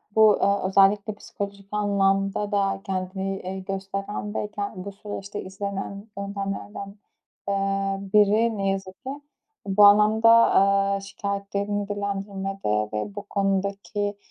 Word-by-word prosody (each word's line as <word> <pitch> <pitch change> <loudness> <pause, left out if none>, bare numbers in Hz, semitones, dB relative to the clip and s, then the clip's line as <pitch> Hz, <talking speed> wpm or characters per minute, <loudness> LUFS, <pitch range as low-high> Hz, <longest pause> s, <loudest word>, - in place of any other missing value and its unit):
bu, 215 -2 +6
aaa, 200 -1 +2
özellikle 200 +2 +4
psikolojik 200 -1 -7
anlamda 200 0 +1
da 195 -1 +1
kendini, 190 0 -3
eee, 190 +1 -5
gösteren 195 +2 -4
ve 210 - -2
ken 200 -3 -5
bu 200 - -5
süreçte 205 0 -7
izlenen 200 +1 -5
yöntemlerden, 200 0 -5 0.5
aaa, 195 0 0 0.2
biri, 215 +2 +4
ne 195 -1 0
yazık 190 +1 -4
ki. 260 - -5 0.6
Bu 205 +1 +6
anlamda, 215 +2 +6
aaa, 200 -3 +4
şikâyetlerini 200 +1 -3
dillendirmede 195 - -2
ve 105 - -3
bu 205 - -5
konudaki, 200 +1 -1
200 Hz, 115 wpm, -25 LUFS, 195-205 Hz, 0.6 s, bu